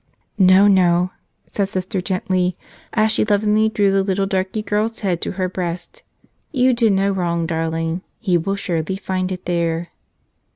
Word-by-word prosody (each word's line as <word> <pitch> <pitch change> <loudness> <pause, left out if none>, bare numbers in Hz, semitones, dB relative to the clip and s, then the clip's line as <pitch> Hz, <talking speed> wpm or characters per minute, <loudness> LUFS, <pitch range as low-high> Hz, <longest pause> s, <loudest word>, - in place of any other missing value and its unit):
"No, 190 +1 +6
no," 180 -2 +3 0.3
said 200 -2 -2
Sister 185 +1 -3
gently, 185 -1 -1 0.3
as 220 -1 +2
she - - +2
lovingly 210 +1 +2
drew 205 -2 +2
the 195 0 +3
little 195 0 0
darky 195 +2 -2
girl's 215 +2 -1
head 180 -5 -1
to - - -3
her 185 0 -1
breast, 180 - -5 0.5
"you 260 -3 +3
did 230 -3 +3
no 195 +1 +2
wrong, 170 -3 -1
darling. 165 +1 -2 0.2
He 190 -6 +1
will 175 +4 0
surely 175 -2 -2
find 185 -1 -3
it 180 -1 -6
there." 170 -1 -1
190 Hz, 160 wpm, -20 LUFS, 175-205 Hz, 0.5 s, No